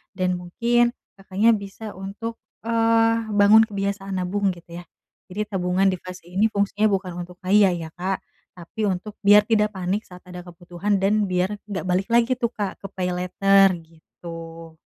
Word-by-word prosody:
Dan 180 -1 0
mungkin, 235 +7 +2 0.3
Kakaknya 195 +4 +2
bisa 205 +1 -6
untuk, 210 +4 -6 0.3
eee, 230 0 +2
bangun 210 +2 +7
kebiasaan 200 -1 -3
nabung 195 +2 0
gitu 170 0 -11
ya. 175 - -17 0.4
Jadi 205 +3 -2
tabungan 185 +1 +1
di 185 - -3
fase 185 -1 -10
ini 195 +5 +2
fungsinya 205 +1 +1
bukan 190 -2 -2
untuk 180 0 -15
kaya 200 +1 +5
ya, 165 -2 -6
Kak, 190 +2 -3 0.3
tapi 180 +5 -5
untuk 195 +3 -4
biar 205 +1 +8
tidak 210 -1 +2
panik 190 +3 -2
saat 180 0 -13
ada 180 0 -8
kebutuhan 175 +3 -3
dan 205 +2 +2
biar 185 +3 -1
enggak 200 -2 -4
balik 185 +2 +1
lagi 235 +2 +4
tuh, 235 -2 0
Kak, 205 -3 -4
ke 195 - -6
PayLater, 185 +1 +3
gitu. 165 0 -11
195 Hz, 160 wpm, -23 LUFS, 180-210 Hz, 0.4 s, biar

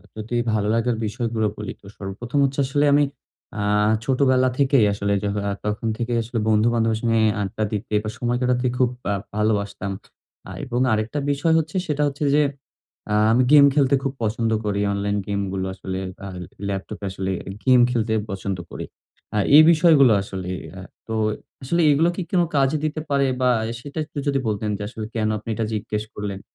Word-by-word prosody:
যদি 110 +2 -7 0.2
ভালো 105 -1 0
লাগার 115 +1 +1
বিষয়গুলো 110 0 -2
বলি 105 - -5
তো - - -20
সর্বপ্রথম 110 +8 -4
হচ্ছে 135 +1 -3
আসলে 145 +2 +1
আমি 145 +1 +5 0.5
আ - - -4 0.5
ছোটবেলা 130 0 +3
থেকেই 135 -5 +4
আসলে 100 0 -1
য - - -1 0.2
আ - - -1
তখন 105 +2 -2
থেকেই 120 0 -1
আসলে 115 +1 -3
বন্ধুবান্ধবের 110 +1 +2
সঙ্গে 115 -1 +2 0.2
আড্ডা 105 +2 -3
দিতে 105 +1 -4
বা 105 - -3
সময় 120 0 0
কাটাতে 125 0 +1
খুব 125 -1 +3 0.2
আ - - +1 0.2
ভালোবাসতাম। 105 -2 -1 0.6
আ - - -7
এবং 125 -2 -2
আরেকটা 110 +6 -1
বিষয় 145 +4 +1
হচ্ছে 155 +1 -5
সেটা 150 -1 0
হচ্ছে 145 +1 -4
যে 150 - +5 0.7
আ - - +1 0.2
আমি 125 +3 +4
গেম 145 -1 +9
খেলতে 140 -2 +4
খুব 135 - -1
পছন্দ 110 +1 0
করি। 100 -1 0
অনলাইন 100 +1 -1
গেমগুলো 100 -2 -2
আসলে 95 0 -5 0.3
আ - - -5 0.4
ল্যাপটপে 100 +1 -5
আসলে 95 0 -3 0.3
গেম 130 -1 +5
খেলতে 115 -2 0 0.2
পছন্দ 95 -1 -3
করি। - - -6 0.5
আর 105 - +2
এই 155 - +11
বিষয়গুলো 155 -6 +5
আসলে 95 -2 -6 0.2
অ্যা 95 - -9 0.3
তো 110 - -4 0.5
আসলে 170 +7 +1
এগুলো 160 +4 +3
কি 190 - -3
কোনো 175 -2 +2
কাজে 135 +2 +3
দিতে 155 0 -2
পারে? 140 -1 +2 0.2
বা 125 - +4 0.3
সেটা 145 +4 -7
এ - - 0
একটু 150 - -13
যদি 140 -1 +2
বলতেন 105 0 -1
যে - - -9
আসলে 110 -2 -6
কেন 110 -1 +1
আপনি 110 +2 -9
এটা 110 - -1
জিজ্ঞেস 105 0 -3
করলেন? 100 -2 -5
115 Hz, 180 wpm, -22 LUFS, 105-135 Hz, 0.7 s, এই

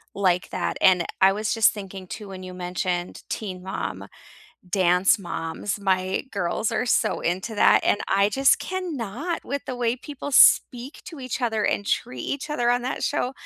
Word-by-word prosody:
like 185 -2 +1
that, - - -2
and 180 -3 +5
I 190 +1 +6
was 215 +2 -1
just 225 -2 +5
thinking 195 -2 -8
too 210 +1 -8
when 185 -1 -8
you 185 0 -8
mentioned 180 0 -3
Teen 185 -4 -5
Mom, 190 +1 -5 0.6
Dance 185 +1 +3
Moms, 175 +3 -4
my 190 -1 0
girls 200 +2 -1
are 245 - -1
so - - +1
into 190 +6 -2
that, - - +5
and - - +2
I 200 +1 +4
just 270 +5 +3
cannot 330 - -4
with 280 0 -4
the 255 - -3
way 240 0 0
people 285 +1 -7
speak 250 +1 +5
to 320 -5 -9
each 255 0 -4
other 220 -3 0
and 205 - 0
treat 125 -1 -2
each 280 - -4
other 240 -5 +1
on 245 0 +1
that 255 - -3
show, 265 -2 0
205 Hz, 180 wpm, -24 LUFS, 185-250 Hz, 0.6 s, I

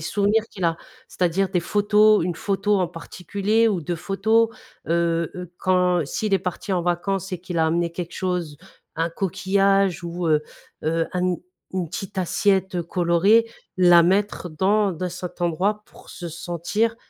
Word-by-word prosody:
souvenirs 205 +7 +1
qu'il 190 - -5
a, 165 -1 +2 0.3
c'est-à-dire 185 +2 0
des 180 - 0
photos, 210 +1 +4
une 175 -2 -2
photo 200 +2 0
en 180 - 0
particulier 200 +7 -1
ou 195 -5 0
2 170 +2 -3
photos, 220 +6 +2 0.4
heu 170 -1 +1
heu, 180 -1 -8
quand 180 -2 +2
s'il 200 +8 -1
est - - +3
parti 185 +2 -4
en 175 -2 +1
vacances 190 +2 -1
et 180 - -3
qu'il 180 -1 -6
a 160 - +3
amené 170 +1 0
quelque 170 0 -6
chose, 180 -5 -3 0.4
un 165 +1 0
coquillage 195 +1 +1
ou, 170 0 -4
heu 150 -1 +3 0.4
heu, 165 +1 +1
un 180 - -1
n 180 -1 +1 0.4
une 180 -3 -2
petite 190 +4 -6
assiette 190 -1 +1
colorée, 180 +6 +3 0.3
la 175 -2 +7
mettre 190 +1 +1
dans 200 +6 +2
dans 180 +2 -3
cet 180 0 -8
endroit 190 +5 0
pour - - -16
se 175 - -7
sentir, 175 +7 -2
180 Hz, 165 wpm, -23 LUFS, 170-200 Hz, 0.4 s, la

